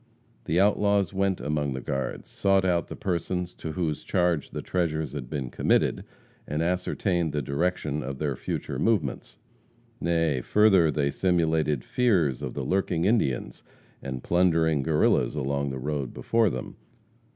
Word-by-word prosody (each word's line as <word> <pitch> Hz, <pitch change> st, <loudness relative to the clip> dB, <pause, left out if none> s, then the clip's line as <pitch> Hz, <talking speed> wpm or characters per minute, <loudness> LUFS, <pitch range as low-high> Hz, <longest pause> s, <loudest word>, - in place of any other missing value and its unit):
The 80 Hz, +3 st, +1 dB
outlaws 100 Hz, -1 st, +2 dB
went 95 Hz, -1 st, 0 dB
among 75 Hz, -2 st, -1 dB
the 65 Hz, -, -4 dB
guards, 65 Hz, +1 st, -4 dB
sought 95 Hz, -1 st, +2 dB
out 85 Hz, -3 st, +1 dB
the -, -, -7 dB
persons 90 Hz, 0 st, -2 dB
to 80 Hz, -, -6 dB
whose 80 Hz, -4 st, -2 dB
charge 90 Hz, -5 st, 0 dB
the -, -, -6 dB
treasures 80 Hz, -5 st, -1 dB
had 65 Hz, -4 st, -6 dB
been 70 Hz, -5 st, -4 dB
committed, -, -, +1 dB, 0.4 s
and 75 Hz, +2 st, -1 dB
ascertained 90 Hz, -1 st, 0 dB
the 75 Hz, -, 0 dB
direction 75 Hz, +1 st, -1 dB
of 70 Hz, 0 st, -5 dB
their 70 Hz, -2 st, -1 dB
future -, -, -4 dB
movements. 100 Hz, -, -1 dB, 0.6 s
Nay, 80 Hz, -6 st, +1 dB
further, 95 Hz, -, +4 dB
they 70 Hz, -2 st, 0 dB
simulated 80 Hz, -7 st, +1 dB
fears 90 Hz, -, +1 dB
of -, -, -5 dB
the -, -, -3 dB
lurking 90 Hz, -3 st, 0 dB
Indians 95 Hz, -, 0 dB, 0.4 s
and 65 Hz, -2 st, -5 dB
plundering 80 Hz, -4 st, +2 dB
Guerrillas 75 Hz, +1 st, +2 dB
along 70 Hz, 0 st, -1 dB
the 65 Hz, -, -4 dB
road 70 Hz, -1 st, -3 dB
before 115 Hz, -2 st, +2 dB
them. 65 Hz, -6 st, -6 dB
80 Hz, 150 wpm, -26 LUFS, 70-90 Hz, 0.6 s, further